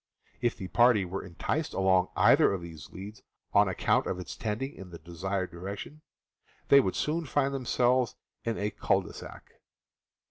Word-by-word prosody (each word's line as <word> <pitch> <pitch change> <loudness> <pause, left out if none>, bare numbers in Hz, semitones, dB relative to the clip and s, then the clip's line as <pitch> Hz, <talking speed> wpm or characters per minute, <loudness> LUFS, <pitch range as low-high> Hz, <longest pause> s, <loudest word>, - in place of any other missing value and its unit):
If 120 -1 +1
the 95 - -6
party 120 -2 +4
were 95 +2 -5
enticed 85 -3 -3
along 95 -1 +3
either - - +5
of 95 -3 -3
these 80 -3 -10
leads, 100 +3 -9 0.3
on - - +5
account - - +1
of - - -2
its 90 -3 -7
trending 120 +5 -3
in 95 - -11
the 85 - -9
de 85 +1 -13
sired 95 +1 -2
direction, 100 - -7 0.7
they 140 - +9
would 95 -9 0
soon 160 +1 -1
find 140 0 +1
themselves 125 -1 +1 0.3
in 115 -1 -2
a 105 +1 -1
cul - - +1
de - - -10
sac. - - -11
100 Hz, 175 wpm, -29 LUFS, 90-125 Hz, 0.7 s, they